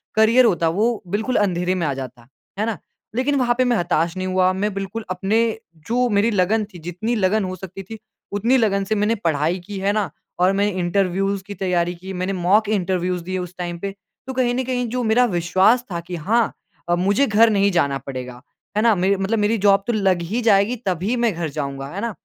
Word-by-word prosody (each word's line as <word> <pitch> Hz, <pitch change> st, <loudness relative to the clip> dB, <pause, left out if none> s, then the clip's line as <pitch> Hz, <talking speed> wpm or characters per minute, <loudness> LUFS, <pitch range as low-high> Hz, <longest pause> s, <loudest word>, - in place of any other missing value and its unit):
Career 225 Hz, +4 st, +5 dB
होता, 170 Hz, -7 st, +2 dB
वो 215 Hz, +7 st, 0 dB
बिल्कुल 220 Hz, +7 st, -1 dB
अंधेरे 180 Hz, -2 st, +1 dB
में 175 Hz, -3 st, -1 dB
आ 140 Hz, -, 0 dB
जाता, 125 Hz, -3 st, -8 dB, 0.3 s
है 215 Hz, -, +1 dB
ना। 225 Hz, -2 st, -2 dB, 0.4 s
लेकिन 265 Hz, +4 st, +1 dB
वहाँ 240 Hz, -1 st, +2 dB
पे 255 Hz, -, +3 dB
मैं 245 Hz, -2 st, +2 dB
हताश 170 Hz, -1 st, 0 dB
नहीं 185 Hz, 0 st, -2 dB
हुआ, 185 Hz, 0 st, +2 dB
मैं 205 Hz, +2 st, -1 dB
बिल्कुल 195 Hz, +3 st, -5 dB
अपने 190 Hz, +4 st, 0 dB, 0.5 s
जो 245 Hz, +2 st, +2 dB
मेरी 210 Hz, +2 st, +2 dB
लगन 210 Hz, +3 st, +2 dB
थी, 175 Hz, -, -10 dB
जितनी 180 Hz, +8 st, -3 dB
लगन 210 Hz, 0 st, +1 dB
हो 185 Hz, 0 st, -4 dB
सकती 190 Hz, +1 st, -9 dB
थी, 220 Hz, +4 st, -9 dB, 0.3 s
उतनी 230 Hz, +6 st, +2 dB
लगन 200 Hz, -5 st, +1 dB
से 215 Hz, +3 st, -1 dB
मैंने 210 Hz, +2 st, +1 dB
पढ़ाई 165 Hz, -2 st, 0 dB
की, 205 Hz, +1 st, -6 dB
है 195 Hz, +1 st, +1 dB
ना। 210 Hz, -2 st, 0 dB, 0.3 s
और 180 Hz, +1 st, +4 dB
मैंने 200 Hz, +1 st, +1 dB
इंटरव्यूज़ 195 Hz, +2 st, 0 dB
की 205 Hz, -, -6 dB
तैयारी 180 Hz, -2 st, 0 dB
की, 190 Hz, +3 st, -8 dB
मैंने 185 Hz, +1 st, -2 dB
मॉक 195 Hz, +4 st, +2 dB
इंटरव्यूज़ 180 Hz, -3 st, -1 dB
दिए 185 Hz, +2 st, -3 dB
उस 180 Hz, -1 st, -5 dB
टाइम 175 Hz, -1 st, -4 dB
पे। 195 Hz, +2 st, -4 dB, 0.3 s
तो 265 Hz, -, -4 dB
कहीं 250 Hz, -2 st, +1 dB
न 260 Hz, -, 0 dB
कहीं 250 Hz, -1 st, -2 dB
जो 250 Hz, +2 st, -2 dB
मेरा 235 Hz, +2 st, +4 dB
विश्वास 190 Hz, +8 st, +3 dB
था 170 Hz, -, -2 dB
कि 180 Hz, -, -4 dB
हाँ 215 Hz, +8 st, +1 dB, 0.4 s
अ, 175 Hz, -, +4 dB
मुझे 200 Hz, +9 st, +2 dB
घर 225 Hz, +2 st, +5 dB
नहीं 200 Hz, -1 st, +2 dB
जाना 140 Hz, -6 st, +1 dB
पड़ेगा, 125 Hz, -2 st, -7 dB, 0.4 s
है 215 Hz, -, +3 dB
ना, 230 Hz, -1 st, +5 dB
मेर 190 Hz, +2 st, +2 dB
मतलब 195 Hz, +4 st, 0 dB
मेरी 210 Hz, +2 st, +2 dB
जॉब 200 Hz, -1 st, +3 dB
तो 240 Hz, -, +1 dB
लग 190 Hz, -5 st, +1 dB
ही 240 Hz, -, 0 dB
जाएगी, 215 Hz, +1 st, +3 dB
तभी 190 Hz, +5 st, 0 dB
मैं 235 Hz, -3 st, +1 dB
घर 165 Hz, -1 st, -3 dB
जाऊँगा, 140 Hz, -2 st, -4 dB
है 190 Hz, +7 st, -6 dB
ना। 235 Hz, 0 st, -2 dB
195 Hz, 220 wpm, -21 LUFS, 180-220 Hz, 0.5 s, Career